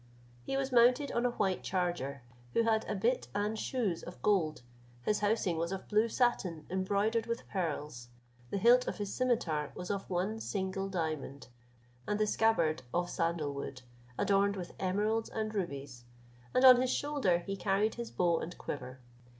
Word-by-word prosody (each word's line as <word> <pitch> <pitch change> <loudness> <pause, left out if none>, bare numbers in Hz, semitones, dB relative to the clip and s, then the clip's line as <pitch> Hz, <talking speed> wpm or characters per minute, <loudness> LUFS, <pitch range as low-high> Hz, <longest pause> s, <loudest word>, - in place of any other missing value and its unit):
He 270 - -2
was 270 0 -1
mounted 250 +4 +5
on 240 +1 +1
a - - -1
white 195 -5 0
charger, 175 -8 -2 0.3
who 230 - +4
had 220 -1 +2
a - - -1
bit 235 +6 +1
and 210 +2 -1
shoes 215 -11 -1
of 175 - -10
gold, 160 -10 +1 0.4
his 210 - +1
housing 205 -5 +1
was 170 +2 -1
of 195 -1 -5
blue 215 +2 +3
satin 190 - 0
embroidered 200 +4 +1
with 230 +1 -3
pearls; 150 -9 -3 0.4
the - - -2
hilt 240 +5 +5
of - - -3
his 205 -2 -4
scimitar 185 - 0
was 180 - -4
of 200 -1 -4
one 190 +5 -1
single 195 -2 -2
diamond, 155 -7 -4 0.6
and 210 - 0
the 215 - +3
scabbard 205 -8 +2
of 175 0 -1
sandal 165 -4 -1
wood, 140 -2 -6 0.3
adorned 200 0 +2
with 180 -3 -6
emeralds 210 +4 0
and 215 -1 -3
rubies, 140 - -4 0.5
and 255 +1 +5
on 250 -1 +9
his 255 - +1
shoulder 285 -12 +1
he 195 +3 -4
carried 200 +3 +1
his 235 -1 -5
bow 170 -2 +1
and 175 - -6
quiver. 130 -2 -6
195 Hz, 170 wpm, -32 LUFS, 170-225 Hz, 0.6 s, on